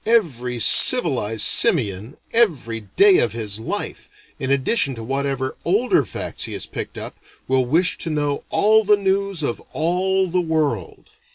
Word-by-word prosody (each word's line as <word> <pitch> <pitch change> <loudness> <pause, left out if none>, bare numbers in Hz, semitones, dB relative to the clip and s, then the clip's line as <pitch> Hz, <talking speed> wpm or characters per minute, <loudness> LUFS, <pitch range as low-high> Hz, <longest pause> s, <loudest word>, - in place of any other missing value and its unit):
Every 135 - -1
civilized 115 - +5
simian, 120 - +2 0.2
every 150 - 0 0.2
day 200 -2 +5
of 120 - 0
his 110 -3 -5
life, 110 - -6 0.3
in 130 - -3
addition 140 - 0
to 115 - -8
whatever 135 +1 -3
older 240 - +1
facts - - -6
he - - -8
has - - -5
picked - - -8
up, - - -8 0.3
will 130 -1 0
wish 170 +7 +1
to 165 - -3
know 145 -2 -2
all 220 +1 +2
the 210 0 +3
news 195 -3 -2
of 120 - -3
all 185 +4 -1
the 180 +1 -1
world. 155 - -3
150 Hz, 155 wpm, -20 LUFS, 125-190 Hz, 0.3 s, civilized